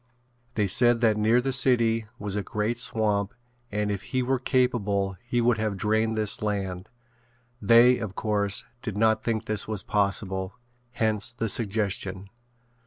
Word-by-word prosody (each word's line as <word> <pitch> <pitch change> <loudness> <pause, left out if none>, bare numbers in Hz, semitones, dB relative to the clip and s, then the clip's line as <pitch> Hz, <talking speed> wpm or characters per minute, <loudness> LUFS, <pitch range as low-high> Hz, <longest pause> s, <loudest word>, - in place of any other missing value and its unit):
They 105 - +1
said 120 +4 +4
that 110 -2 +3
near 110 +3 +3
the 135 +1 -2
city 115 -4 +3
was 100 -1 -4
a 105 - -1
great 105 +4 -3
swamp 105 -3 0 0.4
and 105 0 -1
if 100 -2 -3
he 130 -1 -2
were 130 +1 0
capable 105 -7 0
he 120 0 -1
would 115 -1 +2
have 110 -2 -2
drained 110 +2 0
this 110 -1 +2
land. 100 -2 -3 0.7
They, 120 +4 +5
of 105 -3 -6
course, 100 -2 -1 0.2
did 110 -5 -5
not 110 0 +2
think 115 -1 -2
this 105 -1 -1
was 105 -3 -4
possible, 100 -2 -2 0.4
hence 110 -1 +1
the 115 -2 -3
suggestion. 100 -3 -2
110 Hz, 155 wpm, -26 LUFS, 100-115 Hz, 0.7 s, They